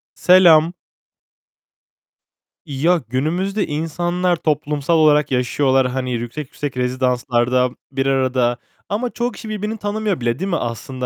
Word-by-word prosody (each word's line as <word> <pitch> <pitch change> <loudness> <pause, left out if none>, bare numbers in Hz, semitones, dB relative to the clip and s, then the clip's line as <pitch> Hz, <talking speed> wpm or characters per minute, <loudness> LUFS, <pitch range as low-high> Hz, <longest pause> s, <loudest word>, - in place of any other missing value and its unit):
Selam. 175 -3 +5 1.9
Ya, 160 +5 +1
günümüzde 175 - -1
insanlar 175 +4 -1
toplumsal 150 0 0
olarak 150 -2 +4
yaşıyorlar. 130 +1 +2
Hani 130 0 -3
yüksek 120 +5 -5
yüksek 145 -1 -6
rezidanslarda 125 0 +1 0.2
bir 135 0 -1
arada 130 -3 +1 0.3
ama 225 +5 -1
çoğu 240 +1 -2
kişi 220 0 -9
birbirini 215 +1 -3
tanımıyor 205 -3 -2
bile, 120 +2 -1
değil 190 +2 -2
mi 175 - 0
aslında? 125 0 -4
150 Hz, 120 wpm, -19 LUFS, 130-180 Hz, 1.9 s, Selam